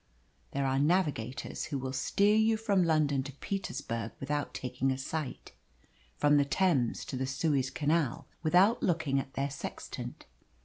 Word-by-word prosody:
There 140 0 0
are 135 0 +1
navigators 145 -6 0
who 145 - -3
will 130 0 -4
steer 200 +10 +3
you 220 0 +4
from 205 -4 +2
London 155 -4 +2
to 140 +1 -7
Petersburg 125 - -4
without 145 +2 -2
taking 125 +1 -2
a 130 - 0
sight, 145 +1 -4 0.7
from 145 0 +4
the 145 - +5 0.2
Thames 155 -11 +2
to - - -5
the 130 +1 -1
Suez 135 0 +1
Canal 145 -1 0 0.2
without 180 +8 +4
looking 160 -6 +1
at 135 0 -7
their 140 +1 -1
sextant. - - -7
145 Hz, 150 wpm, -31 LUFS, 135-170 Hz, 0.7 s, the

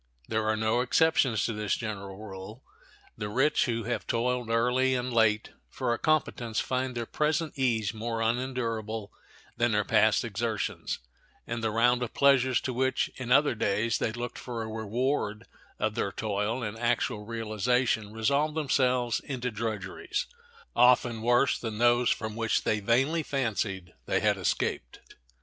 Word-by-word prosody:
There 110 -1 -1
are 110 - +1
no 110 +2 +1
exceptions 130 -4 +3
to 115 - -1
this 105 -1 -1
general 100 -4 -5
rule. 105 +3 -9 0.6
The 105 - -3
rich 135 +7 +2
who 115 -2 -1
have 120 +3 -3
toiled 125 0 0
early 125 +3 +2
and 125 0 -2
late 110 -2 +2 0.2
for 120 - -1
a - - -3
competence 125 -7 0
find 130 0 -1
their 120 -1 -2
present 155 +4 0
ease 115 -6 0
more 115 +1 -3
unendurable 115 -3 -2 0.4
than 120 -1 +2
their 105 0 +2
past 110 0 +3
exertions, 110 0 -2 0.5
and 115 0 -4
the 110 - +2
round 120 +3 +3
of 125 - -4
pleasures 130 -3 +4
to 130 - -3
which, 130 +2 0
in 125 -2 -5
other 145 +2 +5
days, 110 +1 0
they - - 0
looked 120 +1 -5
for 120 -3 -5
a - - -5
reward 110 +1 -2 0.3
of 110 - 0
their 100 - -1
toil 110 +4 -2
in 105 0 -4
actual 120 -2 0
realization, 115 0 0
resolve 140 +8 +1
themselves 130 -5 +1
into 125 -3 -4
drudgeries, 110 -3 -3 0.5
often 120 -2 +4
worse 120 +3 +3
than 110 -3 -4
those 120 +1 +4
from 110 -1 -2
which 115 -1 0
they 110 - +1
vainly 135 +10 +2
fancied 105 - -2
they - - +2
had - - +2
escaped. - - -2
115 Hz, 155 wpm, -28 LUFS, 110-125 Hz, 0.6 s, other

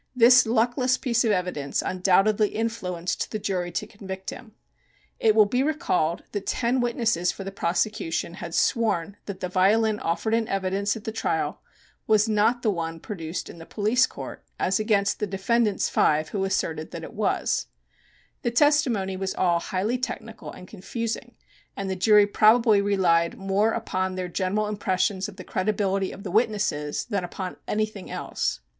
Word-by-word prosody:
This 250 0 +7
luckless 245 +3 +2
piece 240 -2 +1
of 230 - +1
evidence 180 -7 -1
undoubtedly 195 +3 +3
influenced 185 -6 -3
the - - -3
jury 185 -4 -2
to - - -2
convict 190 -2 -7
him. 220 -4 -11 0.7
It 220 -1 +4
will 215 -1 +7
be 245 +5 0
recalled 180 - 0
that 200 -2 -4
ten 245 +1 +1
witnesses 235 -7 +1
for 195 - -8
the 195 - -5
prosecution 170 -2 -1
had 170 - -5
sworn 205 -5 +1
that 195 -2 -6
the 180 - -1
violin 210 +4 +3
offered 195 +7 -1
in 225 -1 +1
evidence 195 +2 -1
at 215 - -11
the 220 - -3
trial 220 - -2 0.5
was 215 0 +4
not 225 +3 +2
the 215 - +3
one 165 -3 -4
produced 165 -3 -5
in 170 - -11
the 165 - -10
police 225 +5 +2
court, - - -9 0.2
as 190 +2 +1
against 210 -2 +1
the 210 - -1
defendant's 205 +2 +1
five 155 0 +2
who 195 -2 -1
asserted 160 -5 -2
that - - -7
it - - -8
was. - - 0 0.7
The - - 0
testimony 240 -7 +2
was 190 0 -3
all 175 -2 +2
highly 210 +7 -1
technical 225 -3 -6
and 180 - -12
confusing, 230 +5 -5 0.4
and 195 -1 -3
the - - -1
jury 205 +2 +5
probably 215 +1 +4
relied 175 -4 +2
more 195 +3 +1
upon 185 -5 -2
their 185 -1 -3
general 190 +4 0
impressions 200 -1 -1
of 200 - -12
the 185 - -9
credibility 195 0 -1
of 200 - -10
the 185 - -5
witnesses 205 -9 0
than 200 -6 -2
upon 180 +1 -5
anything 215 -2 -2
else. 60 - -3
200 Hz, 165 wpm, -25 LUFS, 185-225 Hz, 0.7 s, This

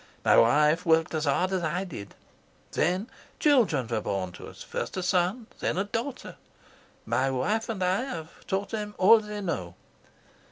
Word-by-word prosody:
My - - +6
wife 150 +8 +4
worked 165 -2 +3
as 155 -1 -1
hard 180 +6 +1
as 190 -1 0
I 170 +3 -1
did. 130 - -9 0.6
Then 185 +5 0 0.3
children 245 - +3
were 110 -2 -1
born 95 -3 -2
to - - -10
us, - - -11
first - - -5
a 185 - -2
son 185 +6 +1
and - - -26
then - - -1
a 195 - +2
daughter. 235 +6 -5 0.7
My 135 +1 +1
wife 205 - -1
and 205 -5 -2
I 185 +7 +1
have 165 -11 -8
taught 195 +1 -1
them 210 -2 -4
all 210 +5 +7
they 210 -1 -6
know. 95 - -3
180 Hz, 175 wpm, -27 LUFS, 150-210 Hz, 0.7 s, all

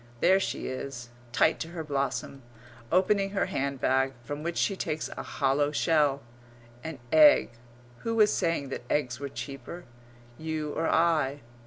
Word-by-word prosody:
There 190 +7 +5
she - - -3
is, 130 -2 -5 0.2
tight - - +3
to - - -4
her 165 -1 -6
blossom; 140 -1 -2 0.5
opening 195 +2 +3
her - - +2
hand 140 0 -2
bag, 135 +1 +2
from 145 +3 -5
which 170 +2 -3
she 195 - +1
takes 155 -4 -3
a - - -6
hollow 145 +1 0
shell 150 -3 +2 0.6
an 160 -2 -5
egg 295 - +7 0.5
who 230 0 -2
was 215 -2 +5
saying 165 -5 0
that - - -4
eggs 125 -4 0
were 140 0 -4
cheaper? 135 +8 -7 0.6
You 155 -1 -3
or 165 - 0
I? 155 -4 +2
150 Hz, 155 wpm, -28 LUFS, 135-170 Hz, 0.6 s, egg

